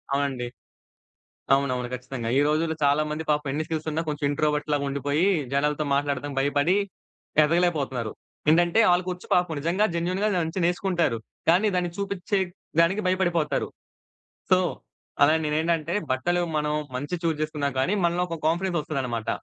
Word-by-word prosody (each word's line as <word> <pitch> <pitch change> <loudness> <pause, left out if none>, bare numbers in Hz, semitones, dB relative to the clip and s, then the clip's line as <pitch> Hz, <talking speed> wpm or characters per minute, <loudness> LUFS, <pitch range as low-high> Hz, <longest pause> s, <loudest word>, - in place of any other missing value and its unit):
అవునండి. 135 -3 -1 1.1
అవునవును. 130 -3 0
ఖచ్చితంగా. 125 -2 -5
ఈ - - +5
రోజుల్లో 160 +1 0
చాలా 145 +2 +4
మంది 155 +1 -3
పాపం 150 -1 +1
ఎన్ని 155 +3 -1
స్కిల్స్ 160 -1 -3
ఉన్నా 160 +2 -1
కొంచెం 150 0 -3
ఇంట్రోవర్ట్ 150 0 0
లాగా 145 -1 +1
ఉండిపోయి. 145 +5 0 0.3
జనాలతో 150 +2 +1
మాట్లాడటం 140 0 -1
భయపడి 145 +6 +2 0.7
ఎదగలేక 175 +3 +3
పోతన్నారు. 125 -5 -3 0.4
ఏంటంటే 175 +6 +4
ఆళ్లకొచ్చు 180 0 0
పాపం 180 -2 +2
నిజంగా 170 +7 +1
జెన్యూన్‌గా 180 +5 0
దాన్నించి 170 +1 -1
నేర్చుకుంటారు. 175 -7 +1 0.3
కానీ 180 +6 +5
దాన్ని 180 -1 0
చూపిచ్చే 200 0 -1 0.4
దానికి 180 +5 +3
భయపడిపోతారు. 175 -4 +1 0.8
సో, 185 - +7 0.7
అలా 150 +2 +6
నేనేంటంటే 160 +1 0 0.2
బట్టలు 175 +7 +1 0.2
మనం 150 0 0 0.2
మంచియి 145 +7 -3
చూజ్ 165 -2 +1
జేసుకున్నా 150 -2 -1
గానీ, 155 +10 +1
మనలో 175 +1 +2
ఒక 165 -1 -4
కాన్ఫిడెన్స్ 175 +2 0
ఒస్తదన్నమాట. 125 -7 -3
155 Hz, 140 wpm, -25 LUFS, 145-175 Hz, 1.1 s, సో